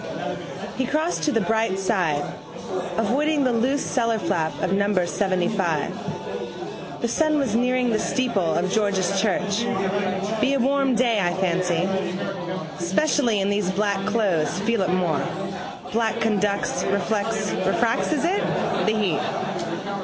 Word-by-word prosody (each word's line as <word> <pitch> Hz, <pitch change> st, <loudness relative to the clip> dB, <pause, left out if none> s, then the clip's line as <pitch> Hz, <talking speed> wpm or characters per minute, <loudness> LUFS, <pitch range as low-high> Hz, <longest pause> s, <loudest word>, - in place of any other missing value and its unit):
He 260 Hz, -, +1 dB
crossed 315 Hz, +5 st, 0 dB
to 300 Hz, -, +2 dB
the 225 Hz, -, +2 dB
bright 220 Hz, -3 st, +1 dB
side, 180 Hz, -7 st, +1 dB, 0.7 s
avoiding 285 Hz, +7 st, +2 dB
the 255 Hz, -2 st, +2 dB
loose 255 Hz, +5 st, +1 dB
cellarflap 200 Hz, -, 0 dB
of 185 Hz, -, +1 dB
number 200 Hz, -2 st, +2 dB
seventyfive. 180 Hz, -4 st, -3 dB
The 235 Hz, -, +1 dB
sun 305 Hz, +5 st, +2 dB
was 265 Hz, -7 st, 0 dB
nearing 250 Hz, 0 st, +2 dB
the 215 Hz, -, +2 dB
steeple 225 Hz, -11 st, 0 dB
of 185 Hz, +2 st, 0 dB
George's 195 Hz, -3 st, +1 dB
church. 205 Hz, 0 st, +1 dB, 0.8 s
Be 275 Hz, +1 st, +3 dB
a -, -, +1 dB
warm 270 Hz, 0 st, +2 dB
day 230 Hz, -2 st, +3 dB
I 175 Hz, -3 st, +1 dB
fancy. 180 Hz, -1 st, +1 dB, 1.0 s
Specially 230 Hz, -, +2 dB
in 195 Hz, +1 st, +1 dB
these 205 Hz, -2 st, 0 dB
black 200 Hz, 0 st, 0 dB
clothes 185 Hz, -7 st, +1 dB
feel 230 Hz, 0 st, +1 dB
it 185 Hz, -, +1 dB
more. 180 Hz, -5 st, +1 dB, 0.7 s
Black 225 Hz, 0 st, +1 dB
conducts, 205 Hz, -2 st, +1 dB
reflects, 205 Hz, +1 st, 0 dB, 0.2 s
(refracts 230 Hz, +7 st, +1 dB
is 310 Hz, 0 st, +1 dB
it?), 375 Hz, +4 st, +1 dB, 0.5 s
the 220 Hz, 0 st, +2 dB
heat. 185 Hz, 0 st, -2 dB
205 Hz, 130 wpm, -24 LUFS, 185-235 Hz, 1.0 s, Be